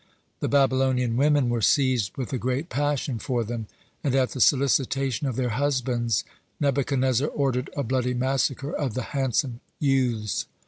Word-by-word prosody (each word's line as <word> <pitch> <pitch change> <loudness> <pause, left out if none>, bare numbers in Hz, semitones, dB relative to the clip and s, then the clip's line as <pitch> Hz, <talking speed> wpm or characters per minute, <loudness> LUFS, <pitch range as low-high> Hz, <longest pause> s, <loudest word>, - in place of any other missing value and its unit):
The - - -1
Babylonian 130 -3 +2
women 145 0 +3
were 120 -1 0
seized 125 -7 +2
with 130 -1 -4
a 130 - -1
great 130 +8 -2
passion 145 -4 -1
for 120 +1 -1
them, 115 -1 -5 0.4
and 135 -3 +1
at 130 -2 +2
the 130 - -4
solicitation 135 0 +2
of 130 - -2
their 125 0 0
husbands, 120 -3 0 0.4
Nebuchadnezzar 135 -1 +1
ordered 135 -3 -1
a 140 - 0
bloody 125 0 0
massacre 135 +2 0
of 135 -7 -2
the 130 - -2
handsome 130 -2 0 0.2
youths. 125 -7 0
130 Hz, 150 wpm, -25 LUFS, 120-140 Hz, 0.4 s, women